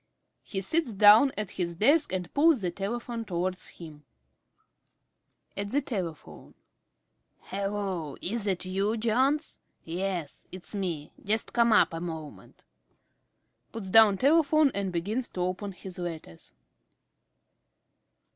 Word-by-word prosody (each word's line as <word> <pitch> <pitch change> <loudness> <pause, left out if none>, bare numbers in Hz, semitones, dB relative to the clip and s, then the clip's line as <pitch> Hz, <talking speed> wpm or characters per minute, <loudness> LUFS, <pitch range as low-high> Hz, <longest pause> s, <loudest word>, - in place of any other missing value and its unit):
He 195 - -4
sits 285 - 0
down 210 +7 +7
at 210 -3 -3
his 170 -2 -3
desk 290 - +3
and 180 -2 -4
pulls 300 -4 +4
the 180 -2 -1
telephone 230 +5 -4
towards 185 -2 -3
him._ 155 -3 -12 1.5
~Smith~ 200 0 -3
(at - - -10
the 285 - +2
telephone). 180 - -6 0.9
Hallo, 195 -6 -4
is 215 +3 -1
that 190 -3 -1
you, 195 +4 -1
Jones?... 260 +7 0 0.2
Yes, 175 -2 -4
it's 185 +2 -8
me. 175 -7 -3
Just 215 +2 -1
come 235 -1 +3
up 210 - +4
a 165 - -4
moment. 160 -3 -8 1.1
(_Puts 205 -5 -6
down 220 -2 +7
telephone 305 - +4
and 200 -2 -2
begins 205 +9 -2
to 180 - -6
open 185 +3 -2
his 185 0 -9
letters. 160 - -8
195 Hz, 125 wpm, -28 LUFS, 180-230 Hz, 1.5 s, down